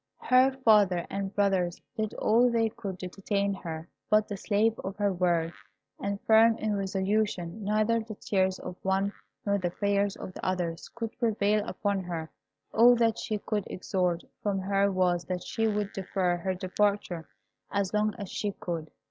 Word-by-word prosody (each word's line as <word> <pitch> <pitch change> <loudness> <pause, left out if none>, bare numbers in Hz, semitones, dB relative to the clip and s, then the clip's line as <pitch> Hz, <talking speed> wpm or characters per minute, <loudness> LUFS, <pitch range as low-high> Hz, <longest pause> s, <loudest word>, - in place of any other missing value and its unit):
Her 255 +1 +5 0.2
father 200 -6 +5
and 195 -1 -2
brothers 190 -4 +1 0.2
did 215 -1 -2
all 240 +3 +4
they 230 -1 +2
could 200 -4 -6
to 185 - -3
detain 200 +2 -1
her; 165 -3 -6 0.2
but 215 0 +4
the 205 - -4
slave 215 +3 +1
of 195 +1 -5
her 205 -1 +1
word, 170 -2 +1 0.5
and 200 0 -2
firm 225 +1 +5
in 215 -1 -1
resolution, 195 -1 -1
neither 215 +3 +2
the 220 -1 -7
tears 190 -2 0
of - - -7
the - - -7
one 195 +1 +1 0.3
nor 200 -1 +2
the 180 -2 0
prayers 200 +2 0
of 185 - -8
the - - -9
others 175 -3 -2
could 230 -1 -5
prevail 210 -3 +2
upon 200 -3 -1
her. 170 -3 -5 0.4
All 240 +2 +7
that 230 -1 +2
they 215 - +1
could 210 -1 -2
extort 180 -2 -1 0.2
from 205 -2 0
her 195 +1 +2
was, 180 -2 +2
that 180 -1 -3
she 225 -1 0
would 210 -1 -1
defer 185 -2 0
her 185 +2 -2
departure 185 -2 -1 0.4
as 200 -1 -1
long 210 0 +1
as 200 - -5
she 205 -1 -2
could. 165 -4 -5
200 Hz, 175 wpm, -29 LUFS, 185-215 Hz, 0.5 s, All